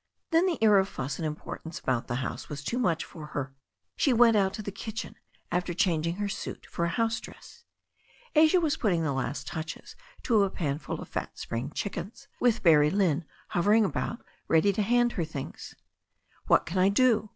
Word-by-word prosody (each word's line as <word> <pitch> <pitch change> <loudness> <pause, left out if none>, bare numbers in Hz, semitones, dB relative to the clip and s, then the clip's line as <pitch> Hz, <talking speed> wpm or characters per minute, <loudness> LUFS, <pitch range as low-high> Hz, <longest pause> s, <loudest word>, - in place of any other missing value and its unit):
Then 330 +3 +4
the 345 - 0
air 210 -2 +7
of 190 0 0
fuss 135 +2 -4
and 165 - -2
importance 160 +1 -6
about 125 -3 -1
the 120 - -2
house - - -6
was 145 -2 -6
too 240 - -2
much 170 -9 +1
for 155 -3 -10
her. 135 -1 -3 0.4
She 270 - +3
went 230 -1 +6
out 195 -2 +3
to 215 - -6
the 200 - -4
kitchen 225 +4 -6 0.4
after 180 -1 -1
changing 170 -2 +1
her 205 +1 -2
suit 200 - -6
for 170 - -2
a - - 0
house 225 +5 0
dress. - - -13 0.7
Asia 315 +4 +6
was 315 -2 +1
putting 180 -7 +1
the 145 -3 0
last 135 +1 -3
touches 160 +3 -6 0.3
to 225 -4 +3
a 195 - +1
pan 150 -6 -2
full - - -5
of - - -8
fat - - -5
spring 120 +4 -4
chickens, 205 - -5
with 240 -2 +2
Barrie 150 -4 +6
Lynne 175 -4 +1 0.2
hovering 210 +5 +3
about 235 +4 -3 0.2
ready 165 +5 +4
to 210 - 0
hand 240 +3 +3
her 175 - -2
things. 150 -4 -7 0.7
What - - +4
can 180 +3 -2
I 185 +2 +5
do?" 220 0 +3
190 Hz, 195 wpm, -28 LUFS, 160-225 Hz, 0.7 s, air